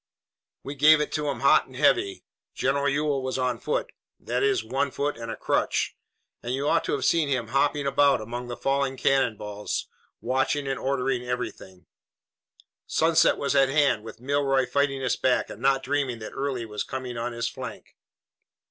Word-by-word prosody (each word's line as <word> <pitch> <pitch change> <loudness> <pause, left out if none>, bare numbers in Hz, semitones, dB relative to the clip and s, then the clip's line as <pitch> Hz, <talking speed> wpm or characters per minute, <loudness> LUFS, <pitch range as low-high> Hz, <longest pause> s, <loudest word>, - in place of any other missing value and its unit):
"We 140 - -5
gave 150 +2 +6
it 150 - -2
to 150 -1 -1
'em 135 -5 -4
hot - - +5
and - - -15
heavy. 100 - +2 0.3
General 140 +1 +1
Ewell 145 -1 0
was 130 0 -3
on 125 -1 -1
foot - - -2 0.3
that - - -2
is, 410 -2 +2
one 140 +2 -1
foot 145 +2 -2
and 115 0 -7
a - - -3
crutch - - 0 0.5
and 125 +2 -2
you 140 +2 -2
ought - - +3
to - - -1
have - - -1
seen 160 -4 +2
him 125 -5 -1
hopping 140 +2 +1
about 140 0 +3
among 120 +3 -6
the 120 -1 -6
falling 135 +1 0
cannon 130 -5 +2
balls, 105 0 -4 0.3
watching 135 +2 0
and 135 -1 -2
ordering 130 -2 -1
everything. 125 -7 -5 1.0
Sunset 160 0 +3
was 140 0 -1
at 135 -1 +5
hand, 135 -6 +2
with 115 - -10
Milroy 135 0 +1
fighting 140 -1 0
us 130 - +1
back 125 -1 +1
and 105 - -10
not 135 0 +2
dreaming 135 -3 -1
that 110 -1 -8
Early 135 -4 -2
was 105 -1 -5
coming 130 -2 -5
on 120 +1 -3
his 115 0 -2
flank. - - -8
135 Hz, 185 wpm, -26 LUFS, 120-140 Hz, 1.0 s, gave